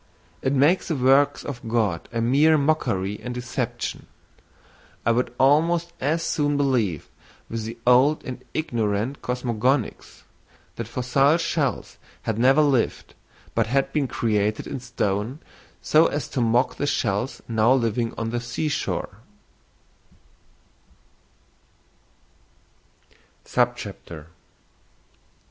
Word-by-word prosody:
It 130 - 0
makes 145 +7 +3
the 165 - -1
works 135 +2 +3
of 125 -4 -6
God 110 -7 0
a 115 -1 -2
mere 145 +7 +4
mockery 105 -10 0
and 125 0 -5
deception; 125 0 -4 1.0
I 115 - +4
would 120 +1 0
almost 165 +5 +3
as 160 +5 0
soon 145 -3 0
believe 120 - 0 0.4
with 115 -1 -3
the 115 +1 -6
old 130 +5 +4
and 130 - -7
ignorant 115 -3 -1
cosmogonists, 125 0 -1 0.5
that 115 - -5
fossil 135 +5 +2
shells 150 - -2 0.2
had 110 -1 -2
never 135 +5 +5
lived, 135 -5 0 0.4
but 115 -1 +1
had 135 +3 0
been 145 -3 +1
created 110 -4 0
in - - -5
stone 115 -1 -2 0.5
so 155 +2 +5
as 145 - -3
to 130 - -2
mock 120 +2 +2
the 145 - -1
shells 115 -2 -1
now 115 +1 +3
living 115 -2 +1
on 115 0 -3
the 120 - -1
sea 120 +6 -3
shore. 150 - -3
125 Hz, 110 wpm, -24 LUFS, 115-145 Hz, 1.0 s, never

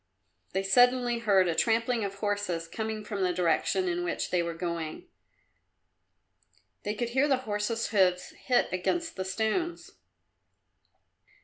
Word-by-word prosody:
They 190 +1 0
suddenly 245 +4 +4
heard 200 -5 +3
a 170 - +1
trampling 230 +4 +1
of 200 -1 -3
horses 200 -5 -2
coming 220 +3 -4
from 205 -2 -4
the 180 -1 +2
direction 180 +2 +1
in 175 0 -1
which 175 - -2
they 180 - +2
were 170 -1 -3
going. 165 -2 -4 1.7
They 210 +1 -3
could 235 +2 -2
hear 265 +4 +2
the 270 -3 +3
horse's 215 +2 -1
hoofs 180 -3 +2
hit 250 - +1
against 325 - -1
the 190 - -3
stones. 220 - -2
205 Hz, 135 wpm, -29 LUFS, 180-230 Hz, 1.7 s, suddenly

